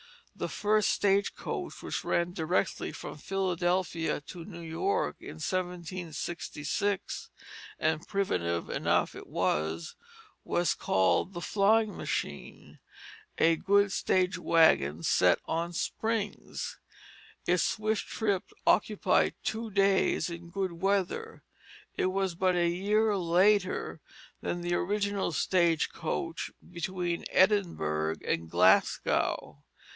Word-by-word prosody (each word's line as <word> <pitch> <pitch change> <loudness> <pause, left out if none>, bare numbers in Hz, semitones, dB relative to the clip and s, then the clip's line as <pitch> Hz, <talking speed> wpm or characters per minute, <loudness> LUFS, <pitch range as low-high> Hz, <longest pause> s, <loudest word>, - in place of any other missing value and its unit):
The - - -3
first 210 0 +2
stage 200 0 +2
coach - - -5
which - - -3
ran 170 +1 0
directly 170 +2 -1
from - - -8
Philadelphia 180 -3 0
to 170 +3 -9
New 170 -2 -9
York 390 - -1
in - - -9
1766 175 0 -3 0.5
and 160 0 0
primitive 85 - -1
enough - - +1
it - - -10
was 80 +2 -1 0.5
was 175 0 +1
called 95 - +1
"the 175 - -5
flying 210 +3 +2
machine, - - -5 0.6
a 165 0 +4
good 200 +2 +3
stage 185 0 +1
wagon 85 - +3
set - - +4
on 170 +1 -2
springs." 220 +4 -3 0.7
Its 180 0 +3
swift 215 0 0
trip 200 -4 -1 0.2
occupied 210 +2 +3
two 225 +1 -2
days 195 -3 +2
in 170 0 -8
good 190 0 -2
weather. 195 - -1 0.5
It - - +1
was 190 -1 0
but 185 +1 +1
a 175 -1 +3
year 205 +5 +2
later 185 +2 +2 0.4
than 175 - -3
the 175 0 -1
original 200 +1 0
stage 170 0 +2
coach - - -3 0.2
between 175 0 -3
Edinburgh 80 - +2
and 80 0 -1
Glasgow. 85 -4 +2
180 Hz, 110 wpm, -30 LUFS, 165-200 Hz, 0.7 s, a